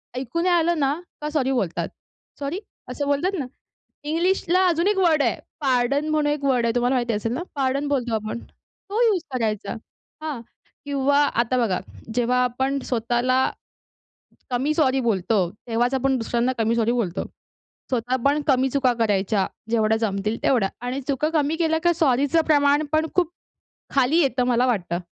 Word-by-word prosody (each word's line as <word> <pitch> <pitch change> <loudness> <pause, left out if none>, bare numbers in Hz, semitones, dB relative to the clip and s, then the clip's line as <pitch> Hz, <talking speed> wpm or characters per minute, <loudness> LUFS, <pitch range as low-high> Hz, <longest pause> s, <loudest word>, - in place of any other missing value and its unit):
ऐकू 260 +6 -2
नाही 355 0 +3
आलं 340 -1 +2
ना, 275 0 +2 0.3
का 300 - -2
सॉरी 270 -3 0
बोलतात. 200 -10 -1 0.5
"सॉरी" 285 +7 -3 0.3
असं 285 - -3
बोलतात 285 +7 +1
ना. 270 - -2 0.6
इंग्लिशला 360 +3 +1
अजून 340 +2 +2
1 415 - +2
वर्ड 320 -5 +4
आहे 235 - 0 0.2
पार्डन 270 +2 +1
म्हणून 305 -1 +1
1 295 -1 -3
वर्ड 250 -3 +2
आहे. 230 - +1
तुम्हाला 245 +2 +2
माहिती 240 -2 0
असेल 220 +2 -2
ना, 300 - -3
पार्डन 275 +1 0
बोलतो 245 -5 -1
आपण. 215 +2 -3 0.5
तो 430 +4 0
यूज 405 -4 +2
करायचा 215 -5 -1 0.5
हां 300 -6 -3 0.5
किंवा 280 0 +1 0.2
आता 250 +2 -1
बघा 210 -7 +1 0.4
जेव्हा 250 +1 +2
आपण 265 +3 -1
स्वतःला 240 +2 +1 1.1
कमी 270 +5 +1
सॉरी 270 -4 +2
बोलतो, 215 -2 +1 0.3
तेव्हाच 240 +3 +1
आपण 265 0 +1
दुसऱ्यांना 235 +2 0
कमी 225 +1 +1
सॉरी 230 0 +2
बोलतो. 205 -7 -1 0.7
स्वतः 250 0 0
पण 290 +2 +3
कमी 265 -1 +3
चुका 260 -2 +2
करायच्या 200 -2 +1 0.3
जेवढ्या 220 -1 +2
जमतील 210 0 -1
तेवढ्या 225 -7 +2 0.2
आणि 265 +2 -2
चुका 285 +3 0
कमी 305 0 +1
केल्या 320 -1 +1
का 345 0 +4
सॉरीचं 285 +1 +2
प्रमाण 290 0 +4
पण 315 +1 +2
खूप 350 -2 +2 0.6
खाली 275 +5 +4
येतं 260 -3 +1
मला 245 0 +3
वाटतं. 180 -8 0
260 Hz, 160 wpm, -23 LUFS, 235-300 Hz, 1.1 s, वर्ड